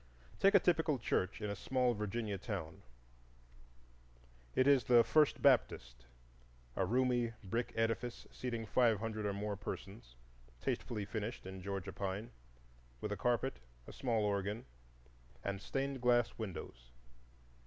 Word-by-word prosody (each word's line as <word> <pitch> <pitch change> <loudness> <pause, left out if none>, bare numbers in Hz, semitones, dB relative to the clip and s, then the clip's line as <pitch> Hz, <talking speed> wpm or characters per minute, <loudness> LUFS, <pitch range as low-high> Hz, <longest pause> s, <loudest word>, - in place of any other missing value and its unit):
Take 195 +1 +5
a - - +9
typical 160 -5 +2
church 100 -3 -1
in 105 - -1
a - - -3
small 125 +3 +1
Virginia 105 -1 -3
town: 90 -7 -5 1.7
it 130 - +4
is 140 -3 +5
the 120 -2 +7
"First 150 +2 +3
Baptist"—a - - -1
roomy 120 0 +2
brick 115 +5 -2
edifice 115 +2 -1
seating 120 -3 -4
five 115 0 +3
hundred 110 -1 -2
or 100 - -1
more 100 +1 -2
persons, 100 - -7 0.4
tastefully 105 - -2
finished 110 +1 -4
in 95 0 -7
Georgia 95 0 -4
pine, 100 +4 -3 0.7
with 105 - -4
a - - 0
carpet, 120 - 0 0.3
a - - -10
small 115 -4 0
organ, 100 +2 -1 0.8
and 100 0 -3
stained 135 +1 -2
glass 120 -1 +3
windows. 80 - -7
110 Hz, 130 wpm, -36 LUFS, 95-120 Hz, 1.7 s, a